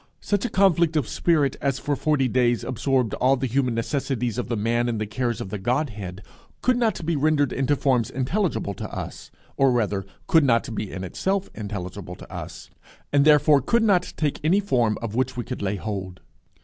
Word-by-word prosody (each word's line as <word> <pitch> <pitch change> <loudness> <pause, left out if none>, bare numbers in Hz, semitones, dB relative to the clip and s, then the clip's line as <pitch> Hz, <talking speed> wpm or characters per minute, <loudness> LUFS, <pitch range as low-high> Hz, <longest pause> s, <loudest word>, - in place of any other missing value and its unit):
Such 205 +2 -1
a - - -1
conflict 175 -5 +3
of 145 -7 +1
spirit 150 -6 +1
as 140 -2 0
for 145 - -1
forty 145 -3 +1
days 120 -1 +2
absorbed 130 -1 0
all 130 +2 +3
the 135 0 -2
human 125 -1 0
necessities 125 -1 -2
of 125 - -3
The 115 - -1
Man 120 +3 +1
in 115 - -1
the 110 - -2
cares 120 +2 -2
of - - -5
the 105 - -4
Godhead 105 -5 -2 0.4
could 255 - +3
not 225 -8 0
be 170 0 0
rendered 145 -2 +2
into 135 +2 +1
forms 130 -5 +1
intelligible 135 - -1
to - - -6
us, - - -7 0.3
or 135 -1 +4
rather, 105 -5 0 0.2
could 160 -2 +4
not 115 -3 +2
be 105 -2 -4
in 95 - -5
itself 190 - -2
intelligible 95 -3 -6
to - - -13
us, - - -8 0.4
and 140 0 +4
therefore 150 -1 +6
could 230 - +2
not 190 -5 +2
take 150 -3 -1
any 175 +6 +4
form 120 - +1
of 110 -3 -4
which 130 +1 -1
we 120 - -2
could - - -6
lay 100 0 -1
hold. 95 -3 -5
130 Hz, 200 wpm, -24 LUFS, 110-150 Hz, 0.4 s, therefore